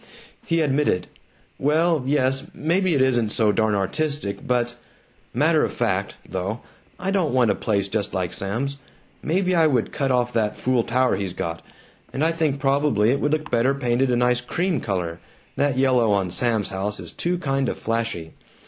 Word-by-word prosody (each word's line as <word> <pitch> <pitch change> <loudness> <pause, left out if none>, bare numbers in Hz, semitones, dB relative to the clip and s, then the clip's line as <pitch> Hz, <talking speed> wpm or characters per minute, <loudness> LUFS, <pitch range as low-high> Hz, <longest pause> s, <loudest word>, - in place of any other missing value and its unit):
He 165 -1 +1
admitted, 145 -9 +1 0.5
"Well, 155 +2 +2
yes, 135 -1 +1
maybe 175 +2 +1
it 135 - +4
isn't 120 -4 +2
so 110 0 +2
darn 110 0 +1
artistic 120 +2 -2
but 120 -1 0 0.6
Matter - - +3
of - - -1
fact, - - -1
though, 95 +5 -3 0.4
I 195 - -2
don't 175 -9 +1
want 120 -4 +4
a - - 0
place 100 -3 0
just 100 0 -2
like 90 -2 -2
Sam's. 120 +10 -2 0.4
Maybe 185 +3 +1
I 165 -2 +5
would 125 -7 0
cut 135 -1 -1
off 125 -1 +1
that 110 -2 0
fool 125 -2 +1
tower 125 +3 +1
he's 95 -3 -3
got, 85 -1 -4 0.5
and 145 +4 0
I 165 - +3
think 155 -4 0
probably 135 -5 +2
it 140 - +1
would 145 - 0
look 155 0 -1
better 125 +3 +2
painted 125 -1 +1
a 125 - +2
nice 125 0 +2
cream 175 +5 -1
color. 90 -4 -3 0.4
That 140 -2 +1
yellow 130 -4 +3
on 95 -3 0
Sam's 110 +1 +1
house 100 +2 -3
is - - -8
too 180 +1 -1
kind 135 -5 0
of - - -4
flashy. 115 -8 -3
125 Hz, 180 wpm, -23 LUFS, 105-145 Hz, 0.6 s, I